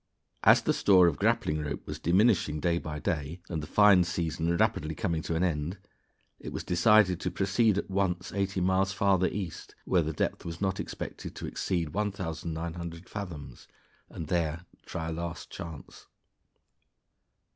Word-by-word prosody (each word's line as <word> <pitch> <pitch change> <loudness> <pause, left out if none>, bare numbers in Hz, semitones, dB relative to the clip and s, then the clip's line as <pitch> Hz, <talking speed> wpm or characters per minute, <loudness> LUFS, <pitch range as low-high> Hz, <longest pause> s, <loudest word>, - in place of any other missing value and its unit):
As - - +6
the - - +2
store 95 -3 +5
of 85 -4 +1
grappling 75 0 +1
rope 75 -1 -5
was - - -6
diminishing 90 -4 +3
day 85 +2 +1
by 75 -2 -5
day, 75 +2 -3
and 80 -3 -2
the 75 - -7
fine 100 0 +6
season 85 -1 -1
rapidly 80 -1 +1
coming 85 -7 -1
to 85 - -3
an 85 - +1
end, 85 +1 -1 0.6
it - - -7
was - - -4
decided 90 0 +4
to - - -2
proceed 100 +2 +2
at - - -2
once 95 -2 -1
eighty 100 -1 -1
miles 95 +1 +2
farther 95 -2 +3
east, 95 -5 -6
where 90 - +3
the 80 0 -2
depth 75 - -2
was 85 0 -6
not 95 -1 -1
expected - - -6
to - - -6
exceed 85 -4 -2
1,900 85 -2 -4
fathoms, 80 - -7 0.4
and 80 - -6
there 85 0 -1 0.2
try 80 -1 -4
a - - -3
last 85 0 -5
chance. 80 -3 -9
85 Hz, 160 wpm, -29 LUFS, 80-95 Hz, 0.6 s, As